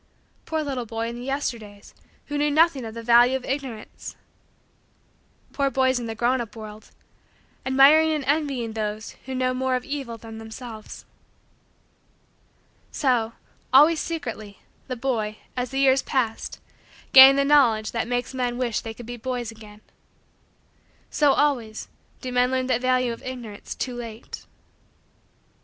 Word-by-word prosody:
Poor 315 -1 -1
little 260 -5 -4
boy 225 +1 -3
in 235 - -6
the - - -8
Yesterdays 230 -7 -5 0.3
who 290 - -5
knew 295 0 +2
nothing 295 -4 +3
of 220 0 -8
the 230 - -7
value 240 +2 +5
of 255 - -11
Ignorance! 265 -5 -6 1.4
Poor 280 -1 +1
boys 260 -1 +2
in 235 - -5
the 225 - -5
grown 245 +3 +1
up 230 -1 -8
world 215 -1 -10 0.8
admiring 285 +4 +6
and 305 -2 -1
envying 275 -6 -1
those 215 0 -4 0.2
who 260 - -4
know 255 0 0
more 260 0 0
of 250 - -3
evil 275 -5 -5
than 225 0 -10
themselves! 220 0 -9 1.9
So, 240 -5 +1 0.4
always, 300 +5 +6
secretly, 230 - -5 0.3
the 255 - -3
boy, 230 -4 -2 0.2
as 250 -1 -2
the 270 - -5
years 270 0 +4
passed, 235 -5 -2 0.5
gained 270 +1 +10
the 280 - +3
knowledge 240 -7 +4
that 230 -1 -2
makes 245 +1 -2
men 245 -2 -2
wish 240 -3 -1
that - - -12
they 225 - -5
could 240 - -10
be 245 +1 -7
boys 245 -1 -4
again. 215 -1 -14 1.3
So, 290 -2 +4
always, 240 -7 0 0.3
do 255 - -5
men 250 0 +3
learn 260 0 0
the 250 -2 +1
value 255 -1 +1
of 230 - -11
Ignorance 240 -5 -7
too 255 - -4
late. 230 -2 -8
250 Hz, 150 wpm, -24 LUFS, 225-270 Hz, 1.9 s, gained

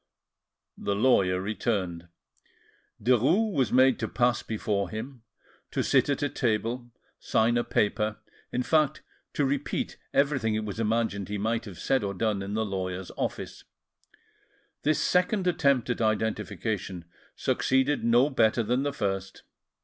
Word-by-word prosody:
The 100 - -1
lawyer 100 -5 +3
returned: 95 -4 -2 0.9
Derues 140 - +3
was 130 -7 +1
made 130 +1 +5
to - - -1
pass 120 +1 +1
before 105 -3 -2
him, 120 +5 -7 0.5
to - - -1
sit - - +3
at 140 +1 0
a 145 - +1
table, 120 0 -1 0.3
sign 115 +2 +2
a 120 - +2
paper, 105 0 0 0.3
in 125 - -1
fact 155 -1 +2 0.3
to 145 - +1
repeat 140 +1 -2
everything 135 -6 +1
it 110 0 -2
was 105 +1 -5
imagined 110 -3 0
he 105 - -2
might 115 +3 -1
have 95 -5 -9
said 130 +6 +1
or 100 0 -3
done 105 0 0
in 100 +2 -4
the 110 0 0
lawyer's 95 -2 -4
office. - - -4 1.2
This 155 0 +2
second 180 +4 +2
attempt 140 -8 +2
at 120 - -2
identification 105 -4 -2 0.3
succeeded 130 +2 +1
no 120 +5 +4
better 115 -2 +3
than 125 +4 +1
the 140 0 -1
first. 95 -5 -3
115 Hz, 140 wpm, -27 LUFS, 100-130 Hz, 1.2 s, made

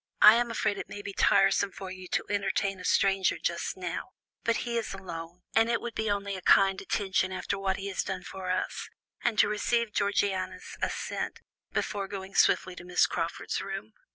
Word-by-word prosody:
I 210 - +12
am 240 +1 +2
afraid 215 -3 0
it - - -6
may 205 - -7
be 200 - -5
tiresome 195 0 +4
for 190 -1 -7
you 185 -1 -8
to - - -1
entertain 195 -1 0
a - - -8
stranger 195 +1 +3
just 170 +2 -2
now, 180 +4 -4 0.3
but 230 +1 +1
he 235 -1 -2
is 225 -4 -2
alone, 175 -2 -8
and 225 +1 +4
it 235 - +2
would 240 -1 -5
be 220 -1 -1
only 200 -1 -1
a 185 - -6
kind 195 +1 +5
attention, 190 -1 0
after 190 +1 -2
what 195 -1 0
he 195 - -6
has 190 - -1
done 190 -2 -4
for 190 0 -6
us," 185 0 -2 0.3
and 235 -3 +1
to - - +6
receive 215 +1 0
Georgiana's 190 -2 -1
assent, - - -3 0.3
before 200 -2 -2
going 195 0 -7
swiftly 185 -1 +3
to - - -8
Miss 180 0 +3
Crawford's 165 0 -2
room. 195 +2 -6
195 Hz, 195 wpm, -29 LUFS, 185-205 Hz, 0.3 s, I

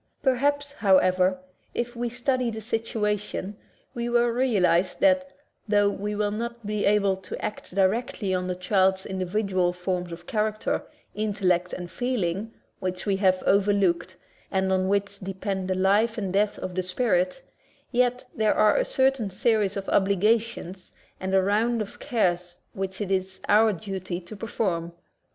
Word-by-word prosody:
Perhaps, 285 +2 +1
however, 185 -5 +3 0.4
if 240 +1 -2
we 240 0 -2
study 250 +1 0
the 220 -1 -5
situation, 210 -3 -2 0.4
we 240 0 -3
will 240 0 +3
realize 200 -8 +2
that, 280 -1 +3 0.4
tho 205 -1 +3
we 210 +1 -3
may 205 0 0
not 235 +1 -5
be 210 0 0
able 200 -2 +3
to 190 -1 -7
act 210 -3 -6
directly 200 0 +1
on 180 0 -1
the 180 - -2
child's 190 0 +2
individual 185 -1 0
forms 180 -1 -3
of 170 +1 -9
character, 215 +1 -1 0.3
intellect, 185 -4 0
and 180 -1 -6
feeling, 220 -4 -2 0.3
which 185 -1 -4
we 200 -2 +1
have 185 -2 +2
overlooked 195 -3 +2 0.3
and 190 -1 +1
on 185 0 +1
which 200 0 0
depend 190 0 -3
the 185 - 0
life 205 +5 +2
and 195 -4 -2
death 205 +1 +2
of 185 - -5
the 185 - 0
spirit; 185 +2 0 0.5
yet 250 0 +1
there 220 -1 +2
are 215 - +4
a - - +2
certain 265 -5 +1
series 205 0 +1
of 195 - -5
obligations 200 -1 +1 0.3
and 190 +1 -1
a 190 - +4
round 225 +4 +2
of 210 -2 -5
cares 180 -8 0 0.2
which 190 +1 -4
it 195 -2 -2
is 190 0 -1
our 215 +1 +5
duty 190 -2 -5
to 180 +4 -11
perform. 180 -6 -2
200 Hz, 155 wpm, -26 LUFS, 185-225 Hz, 0.5 s, our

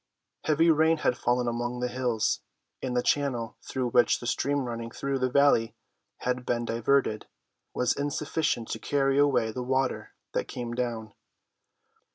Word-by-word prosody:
Heavy 160 +2 +4
rain 160 +1 +4
had 140 - +1
fallen 120 0 0
among 120 +1 -2
the 125 - 0
hills, 125 -3 0 0.4
and 125 -2 -2
the 125 - +2
channel, 125 -6 0
through 130 -2 -2
which 120 - +4
the - - -8
stream 140 +3 0
running 115 -2 -4
through 135 +2 -2
the 130 0 +1
valley 135 -4 +3 0.5
had 125 0 -1
been 120 -1 -1
diverted, 115 -1 +1 0.5
was 125 - +2
insufficient 145 -3 -1
to 110 - -3
carry 135 +2 +1
away 140 -6 +3
the 125 - -4
water 130 +1 -1 0.2
that - - -1
came 120 -1 -5
down. 115 -3 -3
125 Hz, 155 wpm, -28 LUFS, 120-140 Hz, 0.5 s, Heavy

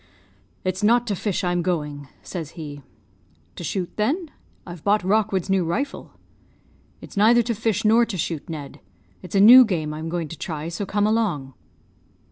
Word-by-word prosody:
"'It's 185 0 -2
not 235 +3 +3
to 210 -4 -2
fish 200 +1 -2
I'm 175 -1 0
going,' 150 -5 -3 0.2
says 165 -4 -7
he. 145 -3 -7 0.7
"'To - - -8
shoot, 180 +2 -3
then? 295 - -1 0.3
I've 175 -3 -10
bought 205 0 +2
Rockwood's 195 -1 +1
new 190 -2 +2
rifle.' 270 - -3 0.9
"'It's - - -12
neither 230 +4 +5
to 235 +1 -1
fish 220 -2 -1
nor 225 +3 +5
to 200 - -4
shoot, 165 -2 -4
Ned: 150 -4 -7 0.4
it's 180 +1 -8
a - - +4
new 245 +6 +10
game 160 -9 -2
I'm 160 +1 -5
going 170 -1 -3
to 165 - -9
try; 155 -1 -4
so 180 +4 -4
come 205 +2 +1
along.' 200 -12 0
185 Hz, 170 wpm, -23 LUFS, 165-215 Hz, 0.9 s, new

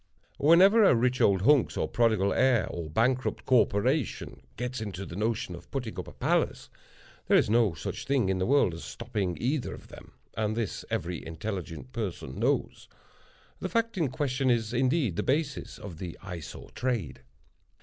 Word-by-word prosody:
Whenever 190 +9 +6
a 195 - +6
rich 125 +2 +1
old 95 -4 +4
hunks 145 +2 +4
or - - 0
prodigal 110 -4 +2
heir 130 -2 +3
or 85 -2 -5
bankrupt 125 - 0
corporation 125 +2 +1 0.2
gets 125 -1 -3
into 100 -3 -5
the 85 - -8
notion 105 -2 -1
of 85 0 -11
putting 125 -5 -4
up - - -6
a - - -9
palace, - - -1 0.6
there - - +5
is - - +2
no 110 -7 +3
such - - -5
thing 135 -7 +2
in 95 -1 0
the 95 - 0
world 140 -10 +3
as 85 - -8
stopping 105 -7 -3
either 135 +2 -1
of - - -15
them, - - -13 0.2
and 110 0 -1
this 115 -5 -3
every 85 0 -3
intelligent 90 +4 -6
person 90 - -5
knows. - - -1 0.7
The - - -3
fact 230 0 0
in 165 -7 0
question 130 0 -1
is 115 -2 +1
indeed 130 - +1
the - - +1
basis 145 +1 -1
of 95 -7 -9
the 90 -3 -6
Eye 90 -3 -6
Sore 75 - -10
trade. 120 - -2
115 Hz, 175 wpm, -28 LUFS, 95-130 Hz, 0.7 s, Whenever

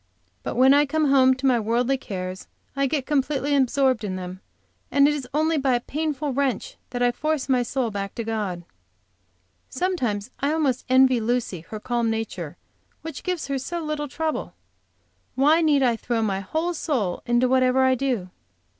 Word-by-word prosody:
But - - -4
when 260 +3 +6
I 290 +1 +4
come 305 0 +1
home 260 -1 +5
to 260 +1 -5
my 250 -3 +4
worldly 235 +4 +1
cares, 185 -6 -6 0.3
I 275 0 +1
get 275 -2 -1
completely 285 0 0
absorbed 265 -3 +2
in 190 -3 -3
them, 185 0 -7 0.5
it 280 0 +5
is 290 -3 0
only 315 +2 +1
by 265 -2 +2
a - - +1
painful 295 +1 -3
wrench 265 -5 -1
that 245 -1 -2
I 245 - +4
force 305 +2 -2
my 255 -2 +3
soul 245 -1 -1
back 200 -1 -4
to 230 - -3
God. 210 -6 -3 1.1
Sometimes 255 - -2
I 285 +2 +1
almost 285 -6 0
envy 260 -1 +5
Lucy 230 -5 -1
her 215 - -5
calm 235 0 -1
nature, 225 0 -4 0.5
which 320 -3 -6
gives 360 -3 -2
her 275 -1 -2
so 340 +6 -4
little 305 -1 -3
trouble. 315 +3 -3 0.8
Why 295 +5 +4
need 295 -4 +3
I 240 -2 +3
throw 230 0 -1
my 195 -3 0
whole 315 - -2
soul 250 - -1
into 240 +1 +3
whatever 260 0 +3
I 260 0 +4
do? 245 -8 -2
260 Hz, 175 wpm, -24 LUFS, 230-290 Hz, 1.1 s, when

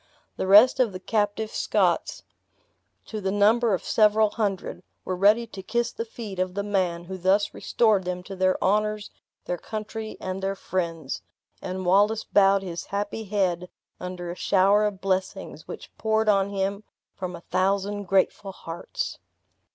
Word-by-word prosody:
The - - -3
rest 210 +8 +7
of 235 -6 +2
the 185 - -6
captive 210 +2 -1
Scots, - - 0 0.8
to 215 -1 -6
the 190 0 -1
number 215 +2 +4
of - - -7
several 215 -1 +4
hundred, 200 -4 -2 0.2
were 185 - -2
ready 210 +5 +4
to 200 -4 -9
kiss 235 +4 -1
the 230 - -5
feet 220 -4 -8
of 185 0 -1
the 200 - -1
man 185 -4 0
who 185 +2 -7
thus 195 +3 +2
restored 215 -5 +2
them 180 0 -4
to 195 - -8
their 185 0 +2
honors, 210 +1 +1 0.3
their 175 -1 -3
country, 215 +2 -6
and 185 0 -4
their 195 +1 -1
friends, 165 -7 -3 0.4
and 185 0 -4
Wallace 205 +4 +3
bowed 195 -1 +4
his 170 -3 -5
happy 205 +2 -3
head 185 -3 0 0.3
under 180 -1 -5
a - - -6
shower 200 +3 +3
of 200 -2 -3
blessings 190 -1 -2
which - - -9
poured 220 0 +1
on 200 -2 +3
him 200 +1 -2 0.3
from 180 -2 -5
a 170 - -10
thousand 200 +2 0
grateful 195 +1 +1
hearts. 180 - -5
195 Hz, 160 wpm, -25 LUFS, 185-210 Hz, 0.8 s, rest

